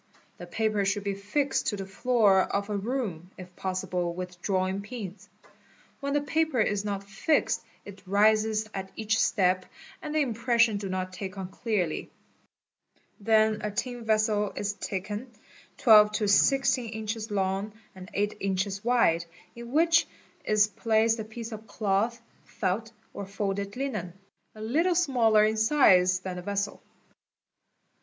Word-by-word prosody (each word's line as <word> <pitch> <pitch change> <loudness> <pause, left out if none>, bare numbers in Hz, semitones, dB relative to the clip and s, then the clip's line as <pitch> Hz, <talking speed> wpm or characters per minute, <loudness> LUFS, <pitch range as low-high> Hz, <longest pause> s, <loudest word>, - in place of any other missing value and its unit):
.The - - -8
paper 215 -2 0
should 200 +1 0
be 200 0 -1
fixed 210 +9 -1
to 210 - 0
the 195 -1 -5
floor 205 -1 +3
of 200 +2 -2
a - - -1
room, 200 -6 -3
if 180 -1 -11
possible 180 -2 -2
with 180 -1 -7
drawing 190 0 0
pins. 205 -3 -8 0.7
When 280 0 -2
the 290 - +2
paper 310 -2 0
is 205 -2 +1
not 200 -1 -3
fixed 200 +11 0 0.2
it 200 -1 -11
rises 215 +2 +3
at 190 -1 -5
each 225 0 0
step 185 -5 +2 0.3
and 305 0 -5
the 310 - +3
impressions 235 -3 +2
do 195 - -4
not*take 185 +1 -4
on 190 -1 -5
clearly, 195 -6 -2 1.1
Then 215 0 +3
a 210 - -2
tin 245 +3 -4
vessel 215 -2 +1
is 205 0 -2
taken, 205 +5 -5 0.5
12 210 -3 +7
to 210 0 0
16 250 +3 +3
inches 220 0 -4
long 195 +1 -1 0.2
and 185 -1 -11
8 205 +1 -1
inches 195 +1 -2
wide, 230 -9 +3 0.3
in 235 0 -9
which 335 +3 +4 0.4
is 215 -1 +4
placed 220 +2 +1
a - - -2
piece 225 +2 -8
of 220 0 -8
cloth, 210 +3 0 0.2
felt, 220 +5 -3 0.2
or 200 - -6
folded 200 0 -3
linen, 250 -10 -3 0.4
a 215 - -10
little 320 +11 +1
smaller 235 -10 +4
in 220 +1 0
size 185 -7 +4
than 185 -1 -5
the - - -5
vessel. 200 +2 -3
210 Hz, 150 wpm, -28 LUFS, 195-230 Hz, 1.1 s, 12